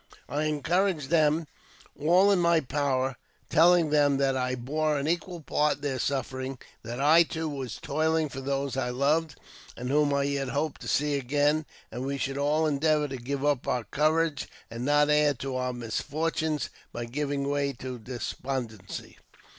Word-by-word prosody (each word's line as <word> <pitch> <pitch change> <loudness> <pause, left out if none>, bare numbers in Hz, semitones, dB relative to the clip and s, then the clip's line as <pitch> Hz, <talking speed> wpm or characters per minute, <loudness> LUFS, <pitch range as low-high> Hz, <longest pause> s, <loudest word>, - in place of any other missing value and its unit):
" - - -29
I 150 +3 -1
encouraged 155 +1 0
them 155 0 +3 0.5
all 180 +7 +4
in 195 - +3
my 170 -1 +4
power, 135 -2 -1 0.3
telling 170 -1 +5
them 145 -2 +4
that 135 -1 +2
I 130 0 0
bore 150 +5 -1
an 140 +1 -2
equal 175 +1 -2
part 150 0 +1
in - - -21
their 135 -3 -2
sufferings; 130 0 -2 0.2
that 120 +2 -6
I, 155 +4 +6
too, 160 -1 -1
was 135 -6 -5
toiling 155 +2 +1
for 135 -1 -7
those 140 0 -2
I 130 -2 -1
loved, 145 +5 +1 0.4
and 125 +1 -4
whom 145 +1 +3
I 140 0 +2
yet 140 -1 -1
hoped 145 +2 -2
to - - -7
see 150 +1 +1
again; 145 +3 +1 0.2
that 120 - -5
we 140 +1 -2
should 135 0 -2
all 150 +3 +2
endeavour 150 0 +2
to 135 - -4
keep 135 +3 -4
up 145 -4 +1
our 125 -2 0
courage, 155 +2 +1 0.2
and 115 +1 -5
not 145 +1 +4
add 150 -2 +3
to 135 -1 -3
our 125 0 -1
misfortunes 150 +6 -2 0.2
by 120 - -4
giving 140 +2 -2
way 140 0 0
to 125 0 -7
despondency. 120 -2 -5
145 Hz, 175 wpm, -28 LUFS, 130-155 Hz, 0.5 s, I